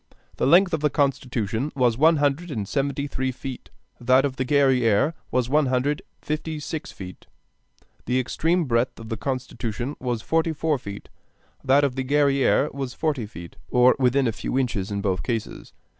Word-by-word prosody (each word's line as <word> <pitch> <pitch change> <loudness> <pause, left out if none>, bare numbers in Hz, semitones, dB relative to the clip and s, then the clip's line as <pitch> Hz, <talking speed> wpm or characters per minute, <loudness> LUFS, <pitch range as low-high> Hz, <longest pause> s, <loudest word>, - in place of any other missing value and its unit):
The - - +1
length 180 +5 +5
of 160 - +1
the 150 +1 +2
Constitution 130 -3 -1
was 125 -4 +2
one 160 +6 +5
hundred 145 +4 0
and 105 -9 -4
seventy 140 +2 -1
three 130 -2 -2
feet, 130 0 -8 0.3
that 130 +3 +4
of 135 -2 -2
the 130 - 0
Guerrière 130 -1 +3 0.2
was 125 -1 0
one 145 +2 +2
hundred 130 +4 0
and - - -35
fifty 155 +1 -3
six 150 +1 -5
feet; 90 -1 -10 0.8
the 125 +2 +2
extreme 165 +7 0
breadth 120 -1 0
of 115 -1 -9
the 115 - -2
Constitution 130 0 -4
was 120 -3 -3
forty 165 0 +1
four 155 -2 0
feet, 100 -2 -9 0.5
that 135 +2 +4
of 135 -3 0
the 130 - -2
Guerrière 140 +1 +2
was 135 -2 -5
forty 145 -9 -1
feet: 85 -5 -11
or 125 0 +5
within 130 +1 +3
a 115 - +2
few 115 - -3
inches 115 -7 -1
in 100 -1 -2
both 95 -4 0
cases. 115 +4 -4
130 Hz, 180 wpm, -24 LUFS, 120-145 Hz, 0.8 s, length